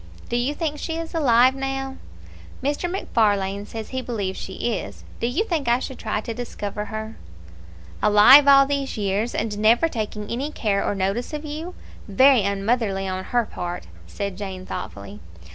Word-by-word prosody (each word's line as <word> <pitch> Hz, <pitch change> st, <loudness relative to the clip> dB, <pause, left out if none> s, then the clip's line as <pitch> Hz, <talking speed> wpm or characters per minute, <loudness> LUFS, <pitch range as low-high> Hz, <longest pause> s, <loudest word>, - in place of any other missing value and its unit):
"Do -, -, -1 dB
you 250 Hz, +5 st, 0 dB
think 300 Hz, -3 st, -3 dB
she 325 Hz, -1 st, -3 dB
is 330 Hz, +1 st, -6 dB
alive 255 Hz, -5 st, +4 dB
now?" 270 Hz, 0 st, -4 dB, 0.7 s
"Mr. 290 Hz, +5 st, -1 dB
MacFarlane 205 Hz, -, 0 dB
says 225 Hz, -1 st, -7 dB
he 260 Hz, 0 st, -3 dB
believes 205 Hz, -7 st, -3 dB
she 190 Hz, +5 st, -3 dB
is. -, -, -6 dB, 0.2 s
Do 235 Hz, -, 0 dB
you 275 Hz, -, 0 dB
think 325 Hz, -, -2 dB
I 235 Hz, +1 st, +4 dB
should 260 Hz, 0 st, -6 dB
try 215 Hz, -1 st, -2 dB
to 230 Hz, -, -5 dB
discover 210 Hz, -3 st, -5 dB
her?" 220 Hz, +1 st, -6 dB, 0.8 s
"Alive 215 Hz, +8 st, +8 dB
all 275 Hz, -1 st, +8 dB
these 275 Hz, -2 st, -2 dB
years, 205 Hz, +3 st, -1 dB
and 210 Hz, -2 st, -2 dB
never 230 Hz, +8 st, +4 dB
taking 215 Hz, -6 st, -4 dB
any 265 Hz, +5 st, -2 dB
care 205 Hz, -8 st, 0 dB
or -, -, -1 dB
notice 195 Hz, +8 st, -2 dB
of 300 Hz, 0 st, -5 dB
you! 315 Hz, +4 st, -6 dB, 0.3 s
Very 260 Hz, +5 st, +5 dB
unmotherly 200 Hz, 0 st, 0 dB
on 185 Hz, 0 st, -3 dB
her 240 Hz, -1 st, +1 dB
part!" 175 Hz, -3 st, -5 dB, 0.2 s
said 200 Hz, -, -5 dB
Jane, 190 Hz, -2 st, -6 dB
thoughtfully. 100 Hz, -, -7 dB
230 Hz, 170 wpm, -23 LUFS, 200-270 Hz, 0.8 s, Alive